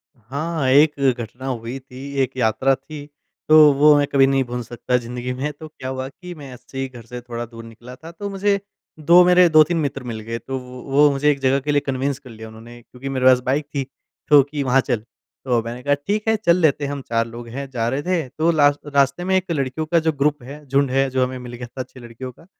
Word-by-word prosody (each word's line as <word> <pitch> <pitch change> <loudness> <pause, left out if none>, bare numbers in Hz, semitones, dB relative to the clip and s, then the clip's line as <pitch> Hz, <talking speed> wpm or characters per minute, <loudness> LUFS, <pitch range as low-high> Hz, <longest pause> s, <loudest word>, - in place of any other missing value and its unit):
हाँ, 140 +5 -3
एक 145 +3 +5 0.2
घटना 120 +3 -7
हुई 120 0 -4
थी। 135 +1 -10
एक 130 - -3
यात्रा 130 +3 +2
थी, 145 +2 -10 0.4
तो 155 - +8 0.2
वो 150 +2 +6
मैं 145 - +3
कभी 135 -1 +5
नहीं 135 0 +2
भूल 125 0 -5
सकता 120 +2 -1
ज़िंदगी 125 +1 -5
में, 135 +4 -3
तो 155 - -8
क्या 130 -4 -8
हुआ 130 0 -4
कि 180 +4 -10
मैं 140 -4 -10
ऐसे 125 +2 -13
ही 135 0 -2
घर 120 -3 -12
से 120 +1 -8
थोड़ा 120 -1 -6
दूर 115 0 -12
निकला 120 +2 -12
था, 160 +5 -12
तो 200 +4 -6
मुझे 200 0 0 0.4
2 170 +4 +6
मेरे 180 0 +6
2-3 155 +2 +5
मित्र 140 -4 -2
मिल 110 -1 -5
गए 115 +1 -4
तो 130 +4 -5
वो 125 -1 -9
वो 145 +2 +6
मुझे 140 +2 +1
एक 140 - -3
जगह 135 +1 +2
के 145 +2 -2
लिए 145 - +3
कन्विंस 135 0 -2
कर 135 -2 -15
लिया 110 -1 -10
उन्होंने। 115 +2 -13
क्योंकि 125 +3 -9
मेरे 130 -1 -1
पास 130 -1 +7
बाइक 140 +3 0
थी 140 - 0 0.5
तो 145 -1 +8
कि 150 -1 -2
वहाँ 130 0 +3
चल। 120 -5 -1 0.5
तो 120 -3 +2
मैंने 120 +2 -6
कहा 145 - +2
ठीक 210 +2 -1
है 220 - +4
चल 180 -5 +2
लेते 150 -4 +2
हम 140 0 -4
चार 115 0 +1
लोग 115 +1 -9
हैं। 135 +3 -6
जा 115 -3 -1
रहे 135 +3 -2
थे 175 -5 -1
तो 155 +5 +1
लास 145 -3 +3
रास्ते 140 +2 +1
में 190 +1 +1
एक 185 -1 0
लड़कियों 140 0 -2
का 170 +2 +2
जो 160 0 +1
ग्रुप 145 -2 0
है 145 +4 -10
झुंड 135 0 +1
है, 135 +1 +2
जो 130 0 +1
हमें 130 0 -3
मिल 125 -1 -9
गया 120 0 -7
था 130 +2 -7
अच्छी 130 +1 -11
लड़कियों 120 +2 -9
क, 165 - -20
135 Hz, 245 wpm, -21 LUFS, 125-150 Hz, 0.5 s, तो